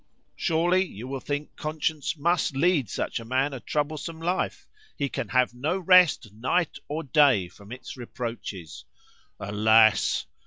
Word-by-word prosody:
Surely, 175 +2 +2
you 125 - -9
will 135 0 -4
think 145 +3 -5
conscience 155 0 -2
must 165 -2 +1
lead 145 - +2
such - - -3
a - - -8
man 130 +4 0
a 135 - -5
troublesome 155 +6 -3
life; 175 +3 -2 0.3
he 140 - 0
can 130 - -4
have 125 -1 +2
no 145 +9 -1
rest 180 - +4
night 140 +10 -1
and 150 -3 -5
day 135 - +5
from 100 +4 -16
its 125 - -8
reproaches. 115 - -7 0.5
"Alas! 110 +2 +3
140 Hz, 145 wpm, -26 LUFS, 115-160 Hz, 0.5 s, day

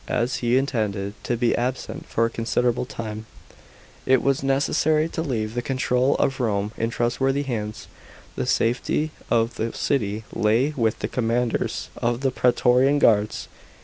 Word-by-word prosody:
As 120 +2 0
he 120 +1 +2
intended 105 -7 -1
to 120 - 0
be 120 0 +2
absent 125 +2 -3
for 115 - +1
a - - 0
considerable 120 +2 0
time, 110 -3 -6 0.8
it 130 -1 +4
was 140 -1 +2
necessary 150 +3 +2
to 165 - -3
leave 115 -8 -2
the 120 - -1
control 130 +1 +1
of 135 0 0
Rome 105 -4 0
in 115 - -1
trustworthy 135 +4 0
hands. 110 -5 -4 0.5
The - - -2
safety 125 +6 +1 0.2
of 115 0 +1
the 115 +1 -2
city 110 -5 -1
lay 115 +7 +2
with 115 -3 +1
the - - 0
commanders 120 0 -1
of 120 +1 -1
the 135 -1 +1
praetorian 125 +3 +3
guards. 105 -6 +2
120 Hz, 150 wpm, -24 LUFS, 115-135 Hz, 0.8 s, it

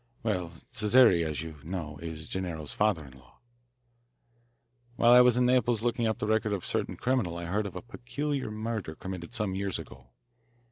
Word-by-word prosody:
Well, 90 -7 -1 0.2
Cesare, 105 -5 +5
as 80 0 -3
you 80 -2 -9
know, 80 -4 -5
is 80 -2 -6
Gennaro's 85 -5 -4
father 105 -8 +1
in 65 -1 -14
law. 65 - -22 1.6
"While 120 0 +5
I 125 0 +9
was 125 -1 +5
in 125 - +4
Naples 120 -3 +2
looking 120 -1 +1
up 110 - 0
the - - -2
record 110 0 +1
of 95 - -3
a - - -8
certain - - -1
criminal 120 -10 0
I 85 - -5
heard 100 +4 -1
of 95 - -9
a - - -6
peculiar 135 +3 -3
murder 110 -6 -4
committed 95 +4 -7
some 105 -4 -1
years 100 0 -2
ago. 65 -1 -11
100 Hz, 185 wpm, -29 LUFS, 85-120 Hz, 1.6 s, I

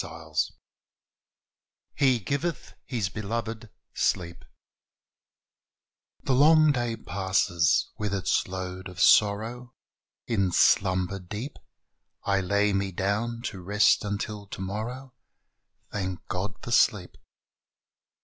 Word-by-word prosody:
183 - - -3 1.4
"HE 130 -4 +3
GIVETH 145 - -3
HIS 115 -8 -1
BELOVED 110 +2 -4 0.2
SLEEP" 85 -2 -1 1.8
The 135 - +1
long 155 +3 +6
day 120 -4 -1
passes 95 -3 +1
with 105 -2 -2
its 95 -2 0
load 95 0 -6
of 90 -2 -11
sorrow: 110 +7 +3 0.5
In 100 -6 +1
slumber 95 +1 +3
deep 105 +9 -7 0.6
I 100 -1 +1
lay 100 +2 +1
me 100 0 0
down 110 +6 -2
to 95 -6 -5
rest 105 +4 +3
until 105 0 -4
tomorrow 110 +8 -5 0.4
— - - -46
Thank 95 -3 -4
God 100 +2 -3
for 120 - -6
sleep. 100 -5 +3
100 Hz, 100 wpm, -27 LUFS, 95-115 Hz, 1.8 s, long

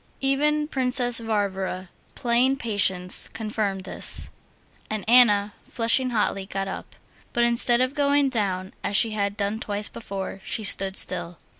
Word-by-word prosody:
Even 295 +2 +1
Princess 250 -3 +2
Varvara, 195 -4 -3 0.3
playing 250 +2 +1
patience, 190 -6 0
confirmed 210 -3 -3
this, - - -3 0.6
and 215 -3 -4
Anna, 210 -4 +5 0.2
flushing 245 +2 +1
hotly, 205 -4 -1
got 195 0 -4
up; 190 - -8 0.4
but 240 - +2
instead 235 +1 +5
of 255 +1 0
going 285 0 +2
down, 195 -7 -2
as 205 - 0
she 225 - +2
had 200 -1 -2
done 205 +2 -2
twice 205 -2 -1
before, 195 -3 -7
she 220 - -4
stood 195 -1 +1
still. 175 -2 +2
215 Hz, 140 wpm, -24 LUFS, 195-245 Hz, 0.6 s, Anna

